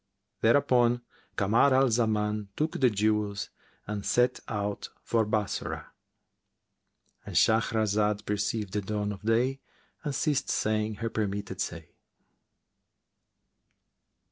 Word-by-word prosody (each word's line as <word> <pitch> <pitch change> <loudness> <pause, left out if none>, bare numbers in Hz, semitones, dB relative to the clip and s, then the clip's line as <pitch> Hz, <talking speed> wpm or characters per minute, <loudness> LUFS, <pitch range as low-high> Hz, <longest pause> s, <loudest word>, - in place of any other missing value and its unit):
Thereupon 120 0 +3 0.3
Kamar 115 +7 +4
al 130 -1 +4
Zaman 105 -2 0
took 155 +1 -1
the 130 -3 +5
jewels 105 -1 0 0.3
and 105 -1 -4
set 125 +3 +2
out 105 -2 -3
for 115 -2 +1
Bassorah,—And 105 -2 -7
Shahrazad 110 -2 +2
perceived 105 0 -2
the 105 - 0
dawn 105 +1 -2
of 100 - -7
day 120 +5 +1 0.4
and 145 -3 -2
ceased 145 -1 0
saying 110 0 0
her 115 +2 -3
permitted 100 -1 -3
say. - - -5
110 Hz, 100 wpm, -28 LUFS, 105-120 Hz, 0.4 s, the